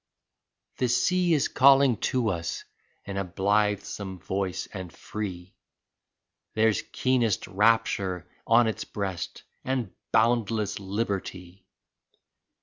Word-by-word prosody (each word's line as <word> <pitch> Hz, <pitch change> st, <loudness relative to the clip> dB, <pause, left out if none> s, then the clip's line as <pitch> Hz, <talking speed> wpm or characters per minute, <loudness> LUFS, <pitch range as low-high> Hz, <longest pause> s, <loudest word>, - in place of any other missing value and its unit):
34 -, -, -1 dB
The 125 Hz, -, +2 dB
sea 175 Hz, +8 st, +2 dB
is 145 Hz, -, +2 dB
calling 135 Hz, -1 st, +5 dB
to 125 Hz, -4 st, +1 dB
us 85 Hz, -3 st, -3 dB, 0.4 s
in 100 Hz, -1 st, -5 dB
a 100 Hz, -, 0 dB
blithesome 100 Hz, 0 st, -1 dB
voice 95 Hz, -1 st, -3 dB
and 95 Hz, -3 st, -6 dB
free, 95 Hz, -1 st, -6 dB, 1.0 s
There's 110 Hz, -1 st, +3 dB
keenest 125 Hz, -5 st, +1 dB
rapture 100 Hz, -3 st, +1 dB, 0.2 s
on 115 Hz, +1 st, +6 dB
its 110 Hz, -, -2 dB
breast 95 Hz, -4 st, -5 dB, 0.2 s
and 125 Hz, -6 st, -2 dB, 0.2 s
boundless 110 Hz, -3 st, +2 dB
liberty 95 Hz, -2 st, -4 dB
105 Hz, 105 wpm, -27 LUFS, 95-115 Hz, 1.0 s, on